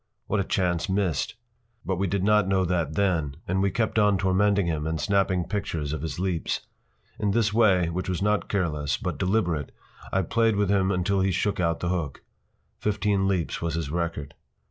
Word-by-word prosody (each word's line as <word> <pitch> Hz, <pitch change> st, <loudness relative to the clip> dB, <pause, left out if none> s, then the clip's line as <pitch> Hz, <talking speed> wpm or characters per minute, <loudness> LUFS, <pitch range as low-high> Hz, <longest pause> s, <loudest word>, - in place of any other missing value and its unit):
What 110 Hz, -, 0 dB
a -, -, +2 dB
chance 90 Hz, 0 st, 0 dB
missed! 95 Hz, -6 st, 0 dB, 0.5 s
But 95 Hz, -1 st, -1 dB
we 95 Hz, +2 st, 0 dB
did 95 Hz, +1 st, -1 dB
not 105 Hz, -1 st, +4 dB
know 95 Hz, -1 st, +2 dB
that 85 Hz, -4 st, -1 dB
then, 85 Hz, -8 st, +1 dB
and 95 Hz, +2 st, +1 dB
we 100 Hz, -, +3 dB
kept 110 Hz, +3 st, 0 dB
on 105 Hz, -2 st, +4 dB
tormenting 95 Hz, +1 st, +2 dB
him 80 Hz, -2 st, -1 dB
and 80 Hz, 0 st, -2 dB
snapping 95 Hz, -2 st, +1 dB
pictures 85 Hz, -8 st, -3 dB
of 80 Hz, -, -3 dB
his 80 Hz, -3 st, -4 dB
leaps. 90 Hz, -3 st, -1 dB, 0.6 s
In 105 Hz, -, +1 dB
this 110 Hz, 0 st, +2 dB
way, 95 Hz, -6 st, +4 dB
which 90 Hz, +3 st, -3 dB
was 90 Hz, -, -1 dB
not 105 Hz, +1 st, 0 dB
careless, 75 Hz, -7 st, 0 dB
but -, -, -4 dB
deliberate, 90 Hz, -7 st, 0 dB, 0.4 s
I 95 Hz, -, +1 dB
played 115 Hz, +4 st, +2 dB
with 100 Hz, -1 st, +1 dB
him 95 Hz, -2 st, +2 dB
until 95 Hz, +1 st, +1 dB
he 95 Hz, -, +2 dB
shook 100 Hz, +2 st, 0 dB
out 85 Hz, -2 st, 0 dB
the 85 Hz, -, -1 dB
hook. 85 Hz, -6 st, -3 dB, 0.6 s
Fifteen 100 Hz, -2 st, +1 dB
leaps 90 Hz, -4 st, -1 dB
was 85 Hz, -1 st, -1 dB
his 80 Hz, -4 st, -3 dB
record. 85 Hz, -4 st, -3 dB
95 Hz, 190 wpm, -26 LUFS, 85-100 Hz, 0.6 s, not